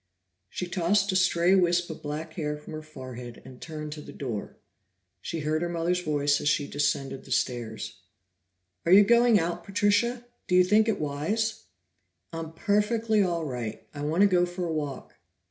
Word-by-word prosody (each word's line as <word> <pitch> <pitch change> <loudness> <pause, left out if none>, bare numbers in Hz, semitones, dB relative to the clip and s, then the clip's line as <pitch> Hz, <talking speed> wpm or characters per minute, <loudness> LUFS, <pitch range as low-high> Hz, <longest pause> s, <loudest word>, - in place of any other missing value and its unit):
She 180 - -4
tossed 190 +3 +1
a - - -2
stray 185 -1 +3
wisp 175 -2 +3
of 160 - -9
black 155 +2 -5
hair 150 -3 -3
from 150 +2 -11
her 155 - -5
forehead 130 -5 -9
and 130 -1 -12
turned 155 -2 -6
to 150 - -8
the - - -10
door. 120 -7 -5 0.6
She 165 - -4
heard 155 +1 0
her 175 - -1
mother's 175 +1 0
voice 145 -3 +1
as 145 - +2
she 145 0 +1
descended 140 -2 -1
the - - -15
stairs. 115 -5 -2 0.8
"Are 170 - 0
you 200 +2 +9
going 235 0 +5
out, 170 +1 -2
Patricia? 205 +6 +1 0.2
Do 180 - +2
you 180 - +7
think 210 +4 +4
it 220 - 0
wise?" 175 +10 -2 0.7
"I 165 - -4
am 160 0 -7
perfectly 215 +3 +1
all 170 -4 0
right. 120 -6 -5
I 145 - -7
want 155 +5 +1
to 205 - +7
go 180 -2 +3
for 175 0 -4
a 165 - -2
walk." 145 -4 -5
165 Hz, 185 wpm, -27 LUFS, 145-195 Hz, 0.8 s, you